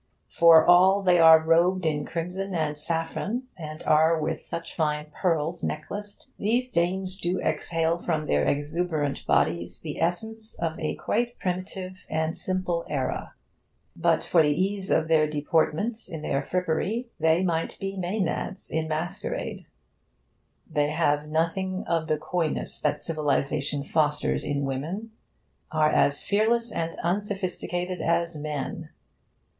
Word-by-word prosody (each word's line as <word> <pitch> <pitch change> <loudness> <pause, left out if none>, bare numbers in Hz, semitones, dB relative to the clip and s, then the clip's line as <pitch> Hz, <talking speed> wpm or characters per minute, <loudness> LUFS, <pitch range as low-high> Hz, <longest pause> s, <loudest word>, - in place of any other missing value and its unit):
For 165 -1 +7
all 190 +3 +6
they 180 -2 +4
are 160 -1 +9
robed 170 +3 +3
in 150 -2 0
crimson 180 +3 -3
and 155 -2 0
saffron, 165 - -2
and 155 -2 -8
are 160 +1 +4
with 160 +1 -2
such 165 - -6
fine 150 -1 -1
pearls 165 -2 0
necklaced, 205 +7 -5
these 245 +5 0
dames 185 +1 0
do 180 +1 -1
exhale 165 0 0
from 155 -3 -1
their 75 - +2
exuberant 145 - -1
bodies 85 +4 +1
the 150 -3 -5
essence 220 +6 -2
of 165 -1 -2
a 155 - -2
quite 240 +2 -1
primitive 185 0 -4
and 160 0 -1
simple 185 -2 -2
era; 140 -3 -3 0.6
but - - +2
for 170 - +4
the 150 - +3
ease 190 +5 -1
of 160 - +2
their 155 -1 +4
deportment 160 +9 0
in 160 -2 -6
their 135 - 0
frippery, 185 +7 -1
they 160 +3 +3
might 165 -3 -1
be 195 0 -4
Maenads 190 +1 -3
in 160 0 -1
masquerade. 155 +2 -4 1.0
They 150 -2 +1
have 150 -1 +1
nothing 170 +4 -1
of 165 -1 0
the 155 - +1
coyness 165 +1 -2
that - - 0
civilisation 145 -2 -1
fosters 150 0 +1
in 140 -1 -1
women, 165 +12 -4 0.6
are 155 -1 +3
as 140 0 +2
fearless 225 +3 +1
and 165 -3 -3
unsophisticated 185 -1 -2
as 170 0 +1
men. 150 -2 -4
165 Hz, 135 wpm, -26 LUFS, 155-185 Hz, 1.0 s, are